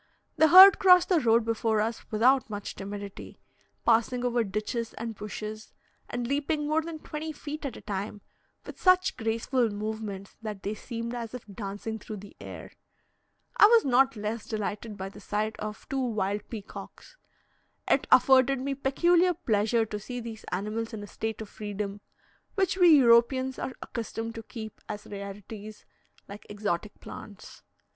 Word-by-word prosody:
The 315 0 +5
herd 375 +4 +10
crossed 360 -2 +6
the 360 -3 +4
road 230 -3 +3
before 225 -1 +1
us 225 +2 -3
without 250 +4 +3
much 205 -1 -5
timidity, 200 0 -8 0.5
passing 240 +2 +2
over 240 -1 +2
ditches 215 +3 -3
and 230 0 -5
bushes, 215 +1 -7 0.4
and 245 0 -3
leaping 295 +3 -1
more 310 +2 +2
than 325 0 -6
twenty 310 +1 -6
feet 300 0 -6
at 255 - -7
a - - -11
time, 205 0 -5 0.4
with - - -10
such 370 0 +4
graceful 230 +1 0
movements 210 -2 -5
that 210 -3 -6
they 205 - -2
seemed 230 +1 -5
as 235 -1 -5
if 250 - -8
dancing 205 +2 -6
through 215 0 -7
the 200 0 -12
air. - - -9 0.9
I 415 - +9
was 460 0 +5
not 265 0 +4
less 215 +1 -4
delighted 215 0 -4
by 190 0 -5
the 205 - -13
sight 215 +2 -2
of 215 0 -6
two 270 -1 -1
wild 205 -3 -2
peacocks. 215 -3 -9 0.7
It - - +2
afforded 265 0 +6
me 275 +2 -2
peculiar 345 +7 +3
pleasure 225 - +1
to 210 -1 -5
see 245 +4 -6
these 225 -2 -8
animals 215 +5 -3
in 205 - -7
a - - -8
state 220 +2 -4
of 215 - -7
freedom, 205 -1 -5 0.5
which 385 -3 +1
we 360 -2 +5
Europeans 260 -1 +5
are 260 - -4
accustomed 230 -1 -5
to 230 - -7
keep 220 -1 -9
as 210 0 -6
rarities, 205 +1 -8 0.4
like 200 +1 -11
exotic 205 -1 -3
plants. 205 -2 -11
225 Hz, 160 wpm, -28 LUFS, 210-265 Hz, 0.9 s, herd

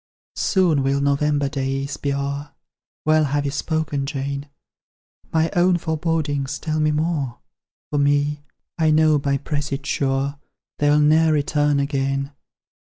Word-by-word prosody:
"'Soon 175 -8 +2
will 135 +1 +1
November 145 0 +1
days 135 0 -2
be 140 - -2
o'er:' 140 +1 -3 0.5
Well 155 0 +4
have 145 +1 -1
you 140 - -1
spoken, 145 -1 -2
Jane: 140 0 -4 0.8
My 160 0 +1
own 175 0 +4
forebodings 155 -4 -1
tell 155 -1 -2
me 155 0 +3
more 150 -5 -1 0.5
For 145 - +1
me, 145 +1 +1 0.4
I 160 -1 +3
know 155 -1 +4
by 140 0 0
presage 145 0 -3
sure, 140 0 -1 0.4
They'll 145 0 +4
ne'er 155 +2 +4
return 145 -1 +2
again. 135 0 -1
145 Hz, 130 wpm, -22 LUFS, 140-155 Hz, 0.8 s, Well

